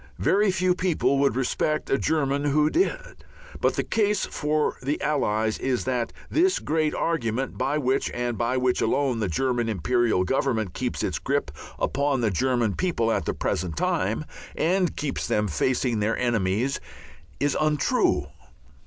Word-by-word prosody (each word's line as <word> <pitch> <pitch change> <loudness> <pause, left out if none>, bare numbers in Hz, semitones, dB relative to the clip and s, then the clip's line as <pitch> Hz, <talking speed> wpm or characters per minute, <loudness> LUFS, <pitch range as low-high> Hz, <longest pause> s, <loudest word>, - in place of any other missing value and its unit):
Very 205 +2 +3
few 185 -1 +2
people 180 -6 +1
would 140 0 +2
respect 155 +4 0
a 135 - +4
German 145 -2 0
who 150 +1 +3
did. - - -1 0.4
But - - +1
the - - 0
case 210 -1 +1
for 150 0 -1
the 140 +3 -1
Allies 110 -7 0
is 130 -2 0
that 125 -2 -1 0.2
this 370 +4 +2
great 155 -1 0
argument 130 -6 -1
by 135 +4 0
which, 135 -2 0
and 120 -1 -2
by 120 +3 0
which 125 -1 +1
alone, 135 -5 +1
the 105 - 0
German 120 +5 0
Imperial 110 0 +1
Government 110 -3 0
keeps - - -3
its - - -1
grip - - -1 0.3
upon 140 -2 0
the 110 -3 +1
German 120 +1 +1
people 120 - 0
at - - 0
the - - -2
present 85 -5 -2
time, - - 0 0.3
and 180 +1 +1
keeps 145 -2 -2
them 105 0 +1
facing 120 - 0
their 105 +2 0
enemies, 115 +2 0 0.6
is 145 0 +1
untrue. 155 -2 +2
130 Hz, 155 wpm, -25 LUFS, 115-150 Hz, 0.6 s, a